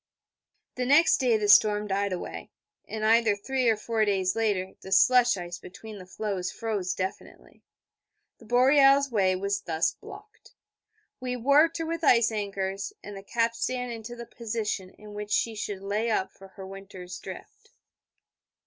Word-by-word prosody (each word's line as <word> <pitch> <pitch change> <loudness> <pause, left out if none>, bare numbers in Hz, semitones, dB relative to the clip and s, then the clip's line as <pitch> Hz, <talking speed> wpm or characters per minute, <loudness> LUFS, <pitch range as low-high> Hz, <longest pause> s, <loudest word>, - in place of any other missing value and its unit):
The 250 - -1
next 295 +5 +5
day 245 -4 +2
the 210 -1 -1
storm 210 0 +5
died 200 0 -1
away, 180 - -6 0.4
and 215 -1 -4
either 225 -1 +4
three 255 +4 0
or 220 - +2
four 220 0 -1
days 190 -3 0
later 205 -4 0
the 190 - -10
slush 245 +3 +5
ice 175 -1 -7
between 215 +3 -11
the 185 - -12
floes 195 -2 -3
froze 205 -5 -3
definitely. 190 0 -7 0.8
The 230 - -16
Boreal's 270 +3 +4
way 190 -4 +2
was 200 +2 -2
thus 160 -1 0
blocked. 430 - -14 0.6
We 250 -1 -3
warped 285 +7 +3
her 330 - -3
with 330 0 -4
ice 235 -5 +4
anchors 195 -2 -3
and 205 0 -8
the 195 - -8
capstan 235 +3 -2
into 230 +1 -7
the 235 0 -8
position 220 -5 -4
in 210 +2 -14
which 210 0 -6
she 225 +1 +1
should 205 -2 -5
lay 210 +4 -1
up 210 -3 0
for 195 - -15
her 190 0 -11
winter's 190 -2 -9
drift. - - -11
215 Hz, 160 wpm, -27 LUFS, 195-240 Hz, 0.8 s, next